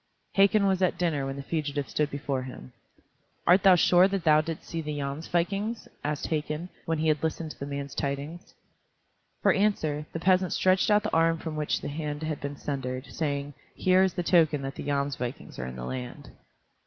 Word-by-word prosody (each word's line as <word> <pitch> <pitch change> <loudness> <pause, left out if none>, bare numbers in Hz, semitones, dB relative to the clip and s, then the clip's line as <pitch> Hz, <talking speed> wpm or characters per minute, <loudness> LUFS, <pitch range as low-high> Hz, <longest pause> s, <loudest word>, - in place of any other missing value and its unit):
Hakon 200 +1 +4
was 190 -1 +2
at 185 - +2
dinner 150 -6 0
when 135 - -4
the 140 - -6
fugitive 145 -2 -2
stood 150 -1 0
before 140 -2 -2
him. 125 - -9 0.7
"Art 180 +3 +6
thou 190 -1 +7
sure 180 +1 +5
that 195 -2 -2
thou 155 -2 +5
didst 160 0 -6
see 165 - -3
the 150 -1 -4
Jomsvikings?" 175 +10 -2 0.2
asked 150 0 -2
Hakon, 155 +2 -2 0.2
when 165 -1 0
he 160 +1 0
had 150 -2 +2
listened 160 0 -2
to - - -13
the 140 - -4
man's 140 -1 -5
tidings. 145 +5 -4 0.9
For - - +5
answer, 155 -8 0
the 165 - -4
peasant 185 +1 +3
stretched 185 +2 +3
out 210 0 +4
the - - -3
arm 165 0 +3
from 160 -1 -5
which 150 -1 -1
the - - -4
hand 150 0 -4
had 155 -2 -3
been 140 0 -4
sundered, 130 -2 -4
saying, 145 -2 -2 0.2
"Here 185 0 +4
is 190 -1 +2
the 175 - -1
token 160 -5 +3
that 135 0 -4
the - - -7
Jomsvikings 140 - -3
are 65 - -3
in 65 - -7
the 60 -1 -6
land." 65 -1 -6
155 Hz, 200 wpm, -28 LUFS, 140-175 Hz, 0.9 s, thou